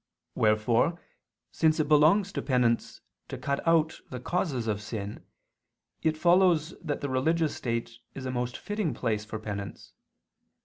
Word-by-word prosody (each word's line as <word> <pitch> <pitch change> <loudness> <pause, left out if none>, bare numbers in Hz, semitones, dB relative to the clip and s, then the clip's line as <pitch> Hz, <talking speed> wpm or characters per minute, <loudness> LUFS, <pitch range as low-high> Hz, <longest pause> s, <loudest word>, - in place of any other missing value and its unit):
Wherefore 115 +9 +2 0.5
since 160 0 +2
it 155 - +1
belongs 155 +7 +4
to - - -3
penance 125 -4 0 0.3
to - - -6
cut 140 0 -1
out 160 -1 +2
the 125 - -6
causes 140 -4 -1
of 105 -2 -1
sin, 105 -1 -6 0.8
it 160 -1 +1
follows 175 -2 +4
that 150 -4 -3
the 140 - -2
religious 155 +5 +1
state 115 -1 -3 0.2
is 135 - -6
a 130 - -2
most 125 -1 -2
fitting 205 -6 -2
place 110 -3 -1
for 110 +1 -5
penance. 100 -2 -7
135 Hz, 145 wpm, -28 LUFS, 115-160 Hz, 0.8 s, belongs